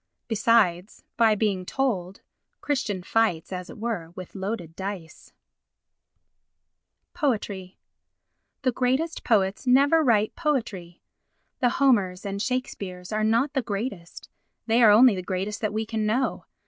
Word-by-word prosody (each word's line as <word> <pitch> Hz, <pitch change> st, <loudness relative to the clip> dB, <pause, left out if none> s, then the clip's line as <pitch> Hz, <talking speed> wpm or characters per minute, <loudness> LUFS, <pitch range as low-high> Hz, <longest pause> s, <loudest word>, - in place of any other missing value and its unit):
Besides, 215 Hz, -4 st, +1 dB
by 225 Hz, -2 st, +4 dB
being 200 Hz, -3 st, 0 dB
told, 195 Hz, -5 st, -2 dB, 0.4 s
Christian 235 Hz, -10 st, -2 dB
fights, 190 Hz, -5 st, 0 dB
as 180 Hz, 0 st, -6 dB
it -, -, -10 dB
were, 215 Hz, -7 st, -3 dB
with 185 Hz, -2 st, -9 dB
loaded 190 Hz, -4 st, -5 dB
dice. 190 Hz, -4 st, -7 dB, 1.8 s
Poetry 210 Hz, -, -2 dB, 0.9 s
The 255 Hz, -, +2 dB
greatest 260 Hz, +7 st, -1 dB
poets 195 Hz, +1 st, +1 dB
never 280 Hz, +5 st, +5 dB
write 220 Hz, -5 st, +2 dB
poetry. 220 Hz, -, -3 dB, 0.6 s
The 250 Hz, -, +3 dB
Homers 205 Hz, -9 st, +2 dB
and 200 Hz, 0 st, -3 dB
Shakespeares 200 Hz, -8 st, -4 dB
are 215 Hz, 0 st, 0 dB
not 230 Hz, +6 st, +2 dB
the 270 Hz, -, +1 dB
greatest—they 220 Hz, +1 st, -4 dB
are 225 Hz, -, +8 dB
only 230 Hz, +3 st, +7 dB
the 185 Hz, -, -3 dB
greatest 190 Hz, +3 st, -4 dB
that 215 Hz, -, -1 dB
we 220 Hz, +1 st, -2 dB
can 220 Hz, -1 st, -2 dB
know. 250 Hz, +5 st, -1 dB
215 Hz, 125 wpm, -25 LUFS, 190-245 Hz, 1.8 s, are